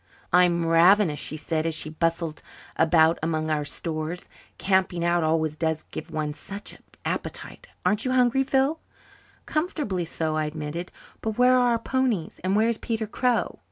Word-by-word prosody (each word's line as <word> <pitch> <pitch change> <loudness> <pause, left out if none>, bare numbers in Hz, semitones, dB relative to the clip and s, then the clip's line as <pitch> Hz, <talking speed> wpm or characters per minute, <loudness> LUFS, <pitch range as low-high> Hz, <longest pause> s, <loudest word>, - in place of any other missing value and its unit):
"I'm 175 -1 +4
ravenous," 165 0 +5
she 155 - -4
said, 155 +1 -1
as 165 - -1
she 155 -1 -4
bustled 165 0 -1 0.3
about 160 0 +4
among 155 0 -1
our 150 -1 +1
stores. 155 +4 -3 0.3
"Camping 190 -3 +1
out 170 -1 +2
always 160 -1 +1
does 160 -1 -1
give - - -6
one 150 -1 -2
such 200 +7 -8
an - - -17 0.2
appetite. - - -4 0.2
Aren't 215 +2 +2
you 255 - 0
hungry, 255 +1 +3
Phil?" 270 +4 +1 0.7
"Comfortably 300 - -1
so," 160 -1 -2
I 155 0 0
admitted. 155 +3 -5 0.3
"But 220 -1 -3
where 250 +1 +5
are 250 -1 +4
our - - +2
ponies? 235 -7 -1
And 190 +2 +1
where 220 +2 +4
is 230 -1 0
Peter 225 -2 -2
Crow?" 240 +2 0
170 Hz, 165 wpm, -25 LUFS, 160-225 Hz, 0.7 s, ravenous